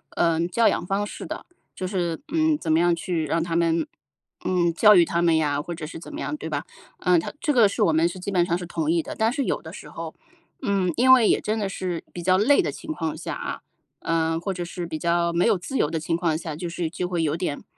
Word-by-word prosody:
嗯， 165 0 +2
教 230 +5 +3
养 - - +1
方 195 +2 0
式 - - -8
的。 - - -6 0.3
就 185 - -4
是， 175 -4 -2
嗯， 315 -1 +3
怎 160 - -1
么 160 - +4
样 175 0 +3
去 170 -2 -2
让 165 +3 +1
他 165 -1 -3
们 165 -1 +2 0.6
嗯， 175 -2 +1
教 210 +4 +7
育 175 -2 +6
他 170 +1 0
们 165 -2 +4
呀， 145 -2 +1
或 170 +3 -6
者 160 -2 -6
是 160 - -8
怎 170 - -10
么 300 - -6
样， 300 - -3
对 230 - -6
吧？ 145 -2 -3 0.3
呃， 180 -1 +3
他 - - -5
这 295 - +1
个 230 -6 +6
是 210 - 0
我 165 -6 +3
们 160 +2 +4
是 175 - -8
基 195 +2 -4
本 180 -3 +3
上 170 0 0
是 180 - -6
同 160 -2 -2
意 165 -1 +2
的， - - -6
但 220 +1 +2
是 275 +2 -1
有 - - -1
的 - - -9
时 - - -10
候， - - -7 0.5
嗯， 195 -6 +1
因 260 +2 +6
为 245 -4 +6
也 - - +3
真 215 +1 -2
的 200 -2 -1
是 180 -3 -4
比 175 - -7
较 185 +1 +4
累 275 +8 +4
的 - - -1
情 315 - -7
况 160 - -3
下 - - -5
啊， - - -5 0.4
呃， 165 0 0
或 185 +4 -3
者 175 -1 -3
是 175 0 -5
比 160 -1 -4
较 170 +1 +1
没 170 +1 +2
有 225 - +4
自 265 +10 -4
由 150 - +1
的 160 - -1
情 165 +1 -1
况 170 -2 0
下， 160 -1 -4
就 175 +3 -5
是 170 -1 -3
就 180 +1 -3
会 175 -2 -1
有 155 -1 +1
点， 170 -4 -3
175 Hz, 290 characters per minute, -24 LUFS, 165-195 Hz, 0.6 s, 教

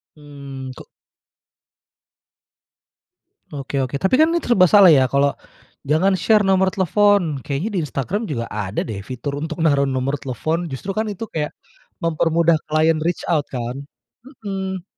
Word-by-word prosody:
Mmm, 140 -3 -9
kok. - - -12 2.6
Oke 140 -1 -3
oke, 130 +1 -2
tapi 190 - +2
kan, 320 - +5
ini 340 - +1
serba 185 -7 +4
salah 200 -4 +8
ya. 130 -3 +4
Kalau 140 0 +2 0.6
jangan 185 +6 +3
share 210 +5 +3
nomor 190 0 +3
telepon, 190 -5 +2
kayaknya 145 +9 -3
di - - +1
Instagram 150 - -3
juga 115 -6 -3
ada 105 -1 -3
deh 105 -4 -6
fitur 130 +6 -6
untuk 160 0 -5
naruh 140 -3 +3
nomor 130 +2 -1
telepon. 160 +6 -3
Justru 135 +8 -5
kan 220 +2 -1
itu 205 +2 -5
kayak 150 -2 -2 0.5
mempermudah 165 0 +2
klien 155 +1 +2
reach 170 +2 -2
out, 150 -4 +1
kan? 125 +1 -5 0.6
Mhm. 190 -2 -4
155 Hz, 145 wpm, -20 LUFS, 135-190 Hz, 2.6 s, salah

